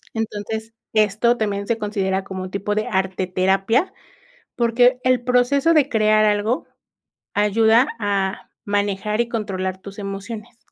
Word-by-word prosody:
Entonces, 220 0 -4 0.2
esto 215 +3 +3
también 200 -2 -2
se 230 - 0
considera 195 -3 -1
como 190 -1 -6
un 185 - -7
tipo 200 +1 -2
de 215 - -1
arteterapia 190 - 0 0.6
porque 245 +1 +3
el 255 -1 +2
proceso 255 +6 +3
de 295 -3 +3
crear 215 -2 +3
algo 210 +4 +1 0.7
ayuda 220 +4 +4
a 200 -2 -2
manejar 205 +1 -1
y 235 - -1
controlar 190 -5 -3
tus 200 +1 -10
emociones. 205 +4 -7
210 Hz, 130 wpm, -21 LUFS, 195-230 Hz, 0.7 s, ayuda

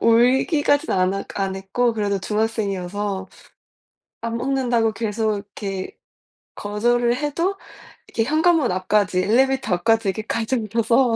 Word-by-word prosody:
울기까진 265 +6 +3
안 185 0 +2
하 195 - -3
안 195 -1 -1
했고 195 +6 0
그래도 205 -2 -1
중학생이어서 200 -2 -2 0.9
"안 230 0 -3
먹는다."고 245 -3 +1
계속 215 0 -1
이렇게 200 -1 -6 0.6
거절을 240 +4 +1
해도 335 +8 -1 0.5
이렇게 225 - -1
현관문 315 +1 +3
앞까지 185 0 +1
엘리베이터 260 -1 +2
앞까지 225 +4 +2
이렇게 220 - -4
가지고 230 +2 -1
와서 235 +2 +3
225 Hz, 310 characters per minute, -22 LUFS, 200-245 Hz, 0.9 s, 울기까진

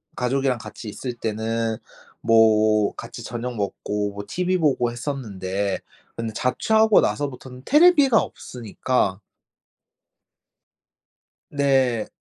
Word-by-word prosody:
가족이랑 130 0 0
같이 110 +1 -9
있을 125 +4 -5
때는 115 0 -2 0.4
뭐 110 -2 +4
같이 - - -9
저녁 120 +1 -5
먹고 105 0 -2
뭐 100 0 -7
티브이 180 +1 0
보고 130 -6 +1
했었는데 100 -7 -3 0.4
근데 115 -1 -4
자취하고 220 - +3
나서부터는 125 +2 -3
테레비가 290 -6 +6
없으니까 115 -4 -2 2.3
네. 135 -5 +1
120 Hz, 230 characters per minute, -23 LUFS, 110-135 Hz, 2.3 s, 테레비가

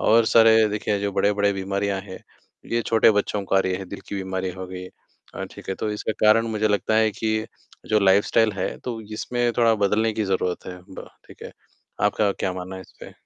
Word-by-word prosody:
और 115 +1 +4
सारे 115 0 +6
देखिए 105 0 -1
जो 100 0 -1
बड़े-बड़े 100 +1 +2
बीमारियाँ 100 0 -2
हैं, - - -9 0.5
ये 115 0 +1
छोटे 115 0 +5
बच्चों 105 0 -1
को 95 - -2
आ - - +6
रही 95 -1 -1
हैं 95 -1 -8
दिल 100 - -7
की - - -5
बीमारी 95 -1 -3
हो 95 +1 -7
गई। 90 0 -8 0.5
अ, - - -4
ठीक - - -13
है 95 - -1
तो 105 - -3
इसका 105 +1 -3
कारण 115 +2 +5
मुझे 110 -1 0
लगता 105 +1 0
है 110 0 +4
कि, 110 +1 -2 0.4
जो 110 - +3
लाइफ़स्टाइल 105 +3 +3
है 95 -2 -3
तो 120 -3 -4
इसमें 120 +2 -1
थोड़ा 115 -1 +4
बदलने 110 +3 +1
की 110 0 -2
ज़रूरत 95 -2 -2
है 90 - -6 0.2
ब - - -9 0.2
ठीक - - -14
है? - - -8 0.5
आपका 105 -2 +2
क्या 95 - -3
मानना 95 +1 -6
है - - -8
इसपे? - - -14
105 Hz, 215 wpm, -23 LUFS, 95-110 Hz, 0.5 s, सारे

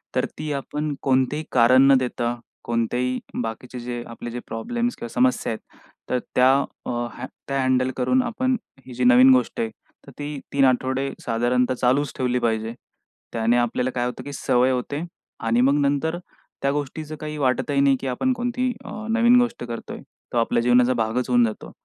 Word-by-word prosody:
तर - - +2
ती 155 -1 -4
आपण 150 +2 -3
कोणतेही 135 +3 +1
कारण 125 +1 +6
न - - +8
देता, 120 -1 -1 0.3
कोणत्याही 120 +2 -1 0.2
बाकीचे 120 +2 -6
जे, 120 0 -5
आपले 115 0 -7
जे 120 - -4
प्रॉब्लेम्स 235 - -2
किंवा 120 - -6
समस्या 125 -1 +2
आहेत, 110 - -4 0.5
तर 125 - +1 0.2
त्या 130 +1 +6 0.4
हँ 120 0 -4 0.2
त्या 135 -1 0
हँडल 130 0 +2
करून 255 - +2
आपण 255 +2 0 0.3
ही 130 - -10
जी 125 - -2
नवीन 125 +2 +7
गोष्ट 125 -2 +1
आहे, 115 - 0 0.4
तर - - -10
ती 145 0 -4
3 140 -1 +4
आठवडे 130 +1 +1
साधारणतः 125 +2 +1
चालूच 130 +3 +1
ठेवली 125 -1 0
पाहिजे. 115 -1 -1 0.6
त्याने 115 +1 +2
आपल्याला 120 +1 0
काय 120 0 0
होतं, 125 - -5
की 145 - -7
सवय 125 -1 +2
होते, 140 +5 -2 0.4
आणि 115 +1 +1
मग 140 +3 +4
नंतर 145 +4 0 0.4
त्या 140 0 +2
गोष्टीचं 150 +2 -4
काही 150 0 -5
वाटतही 140 +1 +1
नाही, 140 -1 +5
की 135 - -5
आपण 255 - 0
कोणती 245 +1 -1
आह, 215 +1 -7
नवीन 235 +2 +5
गोष्ट 240 -1 -2
करतोय. 120 -1 -6 0.3
तो - - 0
आपल्या 115 0 +2
जीवनाचा 125 +1 +4
भागच 120 +2 -1
होऊन 120 -1 +5
जातो. 110 - -5
130 Hz, 175 wpm, -23 LUFS, 120-145 Hz, 0.6 s, न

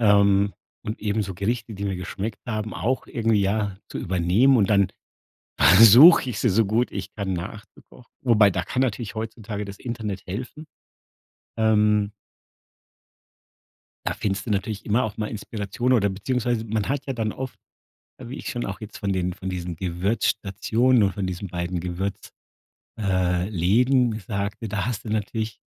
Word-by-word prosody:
ähm, 100 -2 +4 0.3
und 105 - -5
eben 105 0 0
so 95 -2 -6
Gerichte, 115 +3 -2
die 100 - -7
mir 95 -2 -1
geschmeckt 100 +3 -5
haben, 110 -2 -3
auch 130 +3 -1
irgendwie 115 -4 +1
ja 100 0 0
zu - - -6
übernehmen 95 +9 +3
und 105 -4 +2
dann 100 -2 +4 0.7
versuche 115 - +8
ich 110 - -4
sie 120 - +2
so 110 +3 +3
gut 115 +5 +1
ich - - -6
dann 100 -3 -3
nachzukochen. 100 +6 -9
Wobei 110 -5 +5
da 90 -1 -1
kann 130 - -1
natürlich 115 -4 -2
heutzutage 110 -1 -5
das 100 -1 -9
Internet 110 -6 -5
helfen. 125 - -6 0.9
Ähm 105 -2 +3 1.9
da - - 0
findest 100 +3 -3
du - - -1
natürlich 105 +1 -2
immer 115 +4 +2
auch 110 -4 -4
mal 105 -1 -2
Inspiration 110 +3 -2
oder 100 -5 +3
beziehungsweise 115 +3 -1
man 110 -1 -2
hat 140 0 -2
ja 135 - -3
dann 110 -3 -2
oft, 130 +2 -7 0.6
äh, 125 - -9
wie 130 - -6
ich - - -6
schon 120 -1 -3
auch 100 - -5
jetzt 105 -1 -8
von 100 -1 -2
den 90 -1 -1
von 95 +2 -6
diesen 90 -1 -4
Gewürzstationen 100 +6 +1
oder 100 -1 +1
von 100 -2 -3
diesen 90 +2 -5
beiden 85 +1 -3
Gewürz 90 +3 -4 0.7
äh, 95 -2 0
Läden 115 +6 +2
sagte, 100 +3 -4
da 100 +2 -2
haste 115 -2 -4
natürlich 110 0 -2
105 Hz, 165 wpm, -24 LUFS, 95-115 Hz, 1.9 s, versuche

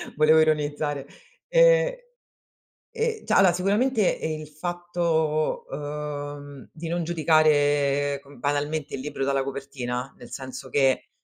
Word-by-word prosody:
volevo 155 +1 +5
ironizzare 150 -2 0 0.4
e - - +4 0.9
e 460 -1 -2
cioè - - +1
allora 190 -3 +6
sicuramente 210 +7 +1
il 155 -1 -3
fatto, 165 -1 -1
uhm, 145 -1 -6
di 165 +1 -7
non 170 +1 -1
giudicare 145 -3 +2
com 140 -2 -16
banalmente 145 +2 -2
il 130 - -6
libro 140 -1 -4
dalla 135 0 +1
copertina, 135 -2 -5
nel - - -13
senso 130 -1 -7
che, 135 -2 +2
150 Hz, 120 wpm, -25 LUFS, 145-170 Hz, 0.9 s, allora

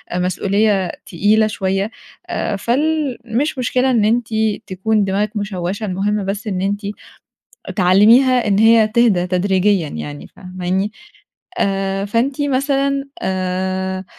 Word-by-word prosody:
مسؤوليّة 190 +1 +1
تقيلة 210 +5 +2
شوية، 195 0 -2 0.4
آآ 205 - -2
فال 280 +5 0
مش 255 +6 -1
مشكلة 255 +1 +1
إن 225 -4 +2
أنتِ 230 +1 +1 0.4
تكون 205 +3 0
دماغِك 200 +2 -1
مُشوَّشَة، 200 0 -3
المُهم 200 +1 -1
بس 200 +3 -4
إن 185 -3 -2
أنتِ 200 +2 -1 1.0
تعلميها 220 +7 +5
إن 200 -1 +2
هي 225 0 +5
تِهدى 215 -5 +2
تدريجيًا 185 -1 +1
يعني 75 - -7
فاهماني؟ 185 +2 -3 0.7
آآ 195 - 0
فأنتِ 255 +7 -1
مثلًا 275 0 0
آآ 185 0 -2
205 Hz, 115 wpm, -18 LUFS, 190-230 Hz, 1.0 s, تعلميها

